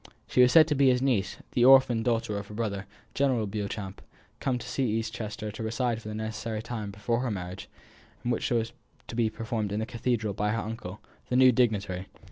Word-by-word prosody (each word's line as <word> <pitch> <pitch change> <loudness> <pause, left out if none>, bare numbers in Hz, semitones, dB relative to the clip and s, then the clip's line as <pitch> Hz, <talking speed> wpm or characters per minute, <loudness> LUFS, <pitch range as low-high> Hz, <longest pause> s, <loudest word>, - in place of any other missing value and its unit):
She 125 - +3
was 125 0 +6
said 160 -2 +8
to - - +3
be 140 -2 +4
his 125 -1 +3
niece, 125 -7 0
the 120 - +2
orphan 130 -3 +7
daughter 115 -2 0
of 100 0 -4
his 105 - -9
brother, 100 -4 -2 0.3
General 130 -5 +1
Beauchamp, 100 -1 -5 0.4
come 130 -2 0
to 130 - -4
East 110 -2 0
Chester 110 -2 -5
to 105 - -8
reside 115 +1 -1
for 105 - -10
the 105 - -5
necessary 110 0 -4
time 110 -4 -4
before 105 +4 -1
her 125 0 -1
marriage, 90 -3 -5 0.5
which 120 -1 0
was 115 -1 0 0.4
to - - -7
be 115 -2 +2
performed 110 -2 -3
in 105 - -1
the 110 - -1
cathedral 115 -2 -1
by 105 +2 0
her 115 - -1
uncle, 105 -3 -7 0.3
the 125 - 0
new 130 0 +7
dignitary. 100 -6 0
110 Hz, 205 wpm, -28 LUFS, 105-125 Hz, 0.5 s, said